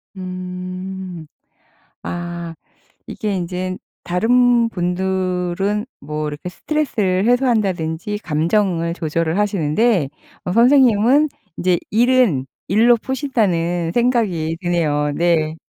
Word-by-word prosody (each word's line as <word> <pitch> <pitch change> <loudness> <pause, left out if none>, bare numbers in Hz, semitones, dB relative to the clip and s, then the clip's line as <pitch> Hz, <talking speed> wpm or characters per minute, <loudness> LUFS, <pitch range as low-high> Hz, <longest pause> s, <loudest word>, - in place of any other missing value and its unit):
음. 185 -1 -6 0.8
아. 175 -1 -5 0.5
이게 210 -2 -3
인제 185 +1 -3 0.3
다른 235 +5 +3
분들은 185 +2 -1 0.2
뭐 150 0 -4
이렇게 150 +5 -6
스트레스를 210 - -1
해소한다든지 210 -6 0
감정을 170 +1 0
조절을 165 +1 -1
하시는데 195 - +1 0.4
어 180 - -1
선생님은 250 +3 +5 0.3
인제 180 -1 +1
'일은 235 - +3 0.2
일로 230 +5 +4
푸신다.'는 185 - -1
생각이 205 -10 +1
드네요. 150 -4 0
네. 160 -2 +1
185 Hz, 220 characters per minute, -19 LUFS, 170-225 Hz, 0.8 s, 선생님은